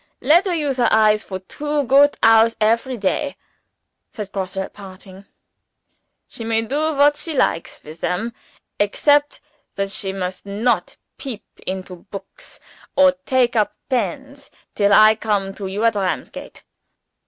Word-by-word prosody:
"Let 345 +6 +4
her 355 - 0
use 290 -5 -1
her 245 - +3
eyes 215 -1 +3
for 190 - -6
two 295 +10 -3
goot 280 +2 +4
hours 225 0 +5
every 230 +4 +1
day," 280 +8 -2 0.7
said 210 -3 -7
Grosse, 190 -1 -4
at 190 - -4
parting. 190 0 -12 1.0
"She 230 - -9
may 225 0 0
do 300 +6 -1
what 290 +1 +4
she 325 -3 -5
likes 165 -9 -1
with 155 +2 -12
them 225 +6 -2 0.5
except 290 +8 +2 0.3
that 195 0 -2
she 195 -1 -1
must 185 -1 -5
not 210 +5 -1 0.2
peep 250 -7 -6 0.2
into 185 -1 -5
books, 195 - -12 0.4
or 280 0 +6 0.2
take 255 -2 +2
up 215 -2 +1
pens, 260 +4 -3 0.2
till 205 -1 +2
I 215 +2 +7
come 205 -3 -2
to 195 -1 -6
you 200 +3 -3
at 230 - +4
Ramsgate. 195 -3 -4
220 Hz, 145 wpm, -20 LUFS, 195-275 Hz, 1.0 s, I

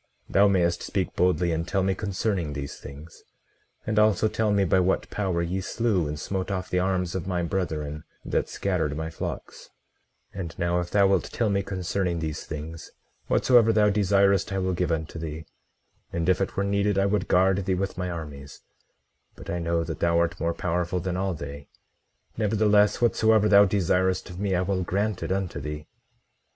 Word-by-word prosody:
Thou 100 +1 +4
mayest 85 -3 +2
speak 95 -4 -2
boldly, 90 -1 +2
and 80 +1 -2
tell 95 +1 0
me 95 0 +2
concerning 95 -5 -2
these 70 0 -5
things; 75 +4 -11 0.6
and 110 0 +1
also 105 -1 +4
tell 110 0 0
me 100 -1 +3
by 95 +1 +3
what 95 +1 +1
power 95 -4 -1
ye 90 +3 -2
slew 100 -4 0
and 75 0 -5
smote 95 +2 -3
off 90 -2 -3
the 90 - +2
arms 90 -1 0
of 95 -1 -4
my 90 -2 -1
brethren 80 -5 -3 0.2
that - - -1
scattered 80 -7 -1
my 80 0 -4
flocks— - - -7 0.6
18:21 100 - -8
And 85 -3 -6
now, 85 0 +1
if 90 0 -4
thou 100 0 +4
wilt 95 -2 +2
tell 110 -3 -1
me 100 0 +1
concerning 95 -2 -2
these 80 -2 -4
things, 80 +1 -7 0.4
whatsoever 120 -3 +4
thou 105 -1 +4
desirest 100 -1 +3
I 95 - -1
will 95 -1 0
give 90 -1 -1
unto 80 0 -3
thee; 80 0 -6 0.7
and 85 0 -2
if 95 +1 +3
it 95 - -2
were 100 - +2
needed, 100 0 +1
I 95 - +3
would 100 -1 0
guard 95 +1 +3
thee 95 - +2
with 95 +1 -2
my 90 -1 -3
armies; 75 -4 -8 0.7
but - - -8
I 85 - -2
know 85 0 0
that - - -5
thou 85 0 +2
art 85 +1 0
more 85 +1 -1
powerful 90 +1 -1
than 90 0 -3
all 95 -1 -1
they; 70 -1 -8 0.7
nevertheless, 105 -1 +3
whatsoever 110 -2 +4
thou 100 -1 +7
desirest 95 -1 +1
of 90 - -9
me 100 -2 0
I 90 - +1
will 95 0 -1
grant 100 +2 -1
it - - -3
unto 95 -2 -2
thee. 75 0 -6
90 Hz, 190 wpm, -26 LUFS, 85-100 Hz, 0.7 s, thou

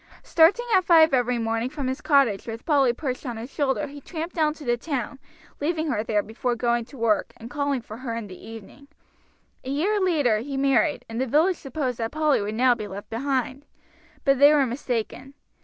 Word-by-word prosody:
Starting 345 +9 +4
at 375 -1 +5
five 325 -3 +5
every 250 -1 +2
morning 225 +1 -1
from 285 -1 -5
his 260 +1 -3
cottage 270 -10 +2
with 225 0 -7
Polly 280 -6 +3
perched 255 0 -4
on 240 -5 -5
his 235 +4 -8
shoulder 285 0 0
he 285 0 -10
tramped 330 +3 -6
down 310 -2 +2
to 305 -1 -11
the 240 0 +2
town, 270 0 -4 0.4
leaving 320 +2 -1
her 215 -3 -1
there 210 -2 0
before 240 +3 -2
going 235 0 0
to 265 +4 -14
work, 225 -3 +1
and 230 +1 -10
calling 285 -3 -1
for 220 -1 -10
her 240 -2 -5
in 230 -2 -4
the 185 -2 -10
evening. 225 +5 -12 0.8
A 260 - -7
year 360 +10 +1
later 295 - +2
he 270 +4 -5
married, 275 +3 +2
and 230 +2 -4
the 265 - -1
village 320 +8 +3
supposed 265 -3 -4
that 225 0 -2
Polly 305 -4 +2
would 210 +2 -3
now 250 +2 +4
be 215 -3 -6
left 200 +1 -9
behind. 260 +2 -2 0.6
But 275 -2 +3
they 285 +1 +8
were 290 -3 +4
mistaken. 250 +1 -4
265 Hz, 205 wpm, -24 LUFS, 230-295 Hz, 0.8 s, they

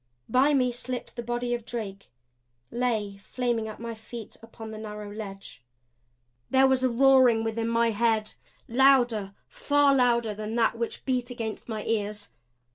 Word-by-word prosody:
By 275 +4 +3
me 250 -2 +2
slipped 245 +1 -5
the 240 - -4
body 240 +1 -2
of 240 -1 -3
Drake; 205 -4 -6 0.6
lay 220 -5 -1
flaming 235 +2 -2
at 215 - -8
my 230 0 -5
feet 220 0 -9
upon 225 -1 -10
the 215 - -7
narrow 210 -1 -7
ledge. 195 - -9 0.9
There 265 0 +5
was 265 -1 +3
a 255 - +3
roaring 255 -2 +5
within 225 0 -2
my 230 0 +2
head 220 0 +1 0.3
louder, 240 -6 +3
far 290 - +3
louder, 235 -4 +2
than 215 +2 -5
that 230 -1 +2
which 230 0 -4
beat 250 -2 -1
against 230 -2 -6
my 215 -2 -3
ears. 210 -2 -2
230 Hz, 155 wpm, -27 LUFS, 215-250 Hz, 0.9 s, There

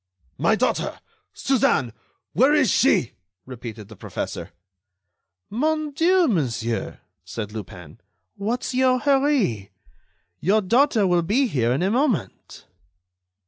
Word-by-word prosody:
"My - - +3
daughter! - - -1 0.3
Suzanne! 215 - +1 0.4
Where 270 +5 +4
is 295 -5 +3
she!" 190 - +3 0.3
repeated 115 -4 -9
the 110 - -13
professor. - - -6 1.0
"Mon 305 +6 -1
Dieu, 345 +4 +3
monsieur," 120 - -2 0.2
said 105 -3 -6
Lupin, 90 -7 -9 0.4
"what's 230 +6 -3
your 255 0 +3
hurry? 265 - +1 0.7
Your 205 +6 +2
daughter 230 +2 +3
will 175 -2 +3
be 215 +11 +1
here 125 - 0
in 135 +7 0
a 190 - +1
moment." 250 - -2
210 Hz, 110 wpm, -23 LUFS, -, 1.0 s, Where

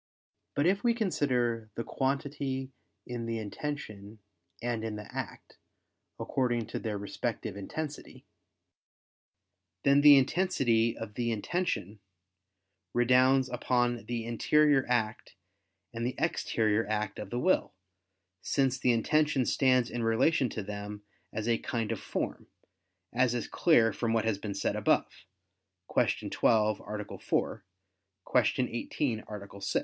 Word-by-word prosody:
But 145 - +2
if 195 +3 +2
we 235 -1 +3
consider 125 - 0
the 115 - -3
quantity 135 0 -2 0.3
in 120 -1 -5
the 115 0 -2
intention 110 -2 -6 0.4
and 120 -2 -2
in 110 -1 -3
the 105 0 -8
act, - - -7 0.6
according 120 -3 0
to - - -3
their 110 -3 -3
respective 105 +1 -4
intensity, 145 +9 -6 1.6
then 140 +1 +5
the 145 -1 +9
intensity 130 -7 +2
of 115 -2 -7
the 120 +1 -1
intention 110 - -2 1.0
redounds 130 +2 +4
upon 120 -1 0
the 120 -2 -3
interior 140 +4 +3
act 115 -4 -1 0.6
and 115 0 -4
the 125 +2 -1
exterior 110 -1 +1
act 105 -1 -2
of - - -6
the 120 - -3
will: 185 - +1 0.7
since 135 -2 +1
the 125 - +3
intention 145 +3 +2
stands 130 -2 +3
in 120 - -3
relation 125 +4 +2
to 110 - -4
them 105 +1 -6 0.3
as 110 +1 -3
a 115 -1 +2
kind 115 -2 -2
of 115 - -2
form, - - -4 0.7
as 125 0 +2
is 120 - -2
clear 115 -10 +4
from 115 -1 -1
what 115 -1 +1
has 110 -3 0
been 100 -2 -5
said - - -1
above - - 0 0.7
(Q. - - +1
12, 110 -2 +3
A. 105 0 -6
4; - - -1 0.8
Q. - - +2 0.2
18, 120 -1 -2
A. 100 -1 -8
6). - - 0
120 Hz, 135 wpm, -30 LUFS, 110-135 Hz, 1.6 s, the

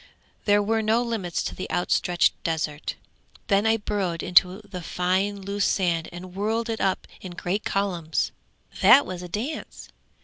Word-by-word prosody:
There 205 0 +4
were 220 +2 +1
no 220 +2 +2
limits 215 -8 -2
to - - -4
the 185 - -6
outstretched 175 0 +2
desert. 160 -2 -2 0.5
Then 200 +1 +3
I 225 0 +4
burrowed 195 -6 -2
into 180 +2 +4
the 195 -4 -8
fine 185 +4 0
loose 200 +1 -1
sand 170 -4 +1
and 180 +1 -9
whirled 225 +4 -1
it 225 - -3
up 190 -1 0
in 185 -2 -7
great 185 +4 -2
columns 175 -5 -1 0.5
that 240 +8 +8
was 180 -1 -6
a 180 - -7
dance! 240 - -5
195 Hz, 160 wpm, -25 LUFS, 180-210 Hz, 0.5 s, that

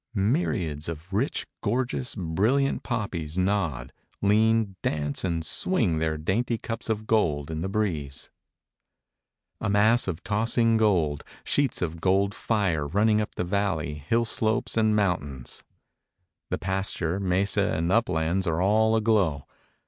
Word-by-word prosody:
Myriads 95 - 0
of 85 +4 -8
rich, 115 +9 0 0.2
gorgeous, 125 +3 -1
brilliant 110 +10 +1
poppies 90 - -3
nod, 90 -10 0 0.3
lean, 110 0 +2
dance 75 -2 -1
and 85 -3 -1
swing 95 - +1
their 80 -1 0
dainty 115 +9 0
cups 115 +1 -5
of 110 -1 -1
gold 80 -10 +1
in 80 0 -3
the 95 - -2
breeze. 80 -10 -2 1.3
A - - -2
mass 110 +4 +4
of 90 -3 -4
tossing 115 +2 +2
gold, 90 -10 +2 0.2
sheets 140 -9 +1
of 80 -1 -4
gold 100 +2 +2
fire 95 -12 0
running 105 +6 +2
up 105 - -5
the - - -1
valley, 90 -6 -1
hill 85 +12 0
slopes 110 0 0
and 110 -1 +3
mountains. 75 - -2 0.9
The - - -1
pasture, 95 -2 -1
mesa 95 0 +1
and 85 +2 0
uplands 95 -4 +1
are 80 0 0
all 110 +4 +3
aglow. 105 -11 +2
95 Hz, 135 wpm, -26 LUFS, 80-110 Hz, 1.3 s, mass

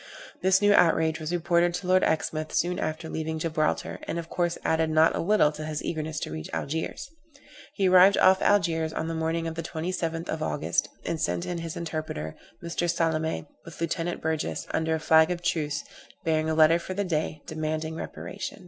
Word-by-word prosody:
This 190 +2 +3
new 205 0 +6
outrage 160 -3 +3
was 155 +1 -4
reported 175 0 +2
to 180 - -5
Lord 185 +1 +4
Exmouth 155 0 -1
soon 180 +1 +1
after 155 +1 -3
leaving 160 0 -3
Gibraltar, 155 -1 -1
and - - -2
of 165 -1 -5
course 175 -1 -1
added 160 0 +2
not 155 +1 +4
a - - -2
little 190 -4 +3
to 155 0 -7
his 155 -1 -4
eagerness 155 -1 -3
to - - -4
reach 80 0 -6
Algiers. 160 - -3 0.7
He 195 -3 +2
arrived 185 +2 +7
off 190 0 +5
Algiers 165 -5 +2
on 160 - -2
the 165 - -2
morning 165 +1 -1
of 165 - -3
the 165 - -4
27th 165 0 -3
of 160 - -3
August, 150 -1 0 0.2
and 160 - -2
sent 85 0 -1
in 175 -1 -3
his 165 -1 -5
interpreter, 155 - -4 0.3
Mr. 170 +1 -1
Salame, 160 - 0 0.2
with 165 - -12
Lieutenant 170 +1 -2
Burgess, 160 -1 -2
under 160 0 0
a - - -2
flag 160 +1 +5
of 175 -1 -3
truce, 150 -4 -1 0.4
bearing 160 -1 +1
a 160 - 0
letter 160 +2 +6
for 185 +2 -6
the 205 - 0
Dey, 155 -3 -2
demanding 155 0 -3
reparation. 190 +4 -6
160 Hz, 195 wpm, -27 LUFS, 155-175 Hz, 0.7 s, arrived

